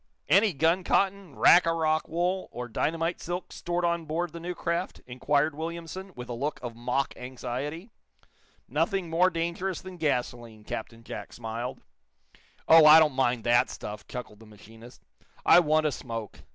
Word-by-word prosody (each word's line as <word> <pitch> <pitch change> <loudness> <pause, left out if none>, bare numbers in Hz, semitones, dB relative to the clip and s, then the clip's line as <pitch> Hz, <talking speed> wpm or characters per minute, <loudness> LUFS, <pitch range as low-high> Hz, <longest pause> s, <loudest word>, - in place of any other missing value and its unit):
"Any 200 +2 +5
gun 165 +6 +2
cotton, 195 -5 0
rack 175 -1 +6
a 165 - +2
rock 155 -1 +1
wool 180 +3 -1
or 125 0 -6
dynamite 165 +8 -1
silk 175 +2 -5
stored 175 0 -2
on 170 -1 0
board 165 +2 -3
the 170 - -7
new 175 +1 -5
craft?" 170 +2 -3
inquired 145 +5 0
Williamson, 170 +4 -6
with 125 0 -8
a 120 - -5
look 140 +6 -3
of 120 -2 -6
mock 125 +3 -1
anxiety. 130 - -6 0.8
"Nothing 195 -5 -1
more 180 +3 +4
dangerous 170 +2 -3
than 185 -1 -10
gasoline," 120 -7 -2
Captain 115 +2 -7
Jack - - -8
smiled. 115 +1 -5 0.9
"Oh, 160 -1 +8
I 155 +1 +10
don't 155 -3 +5
mind 125 -3 +1
that 120 0 +3
stuff,". 105 0 -8
chuckled 115 -4 -8
the 110 - -15
machinist. 110 +3 -15 0.4
"I - - +8
want 155 -2 +2
a 150 - +2
smoke. 115 -5 -6
155 Hz, 165 wpm, -27 LUFS, 120-170 Hz, 0.9 s, I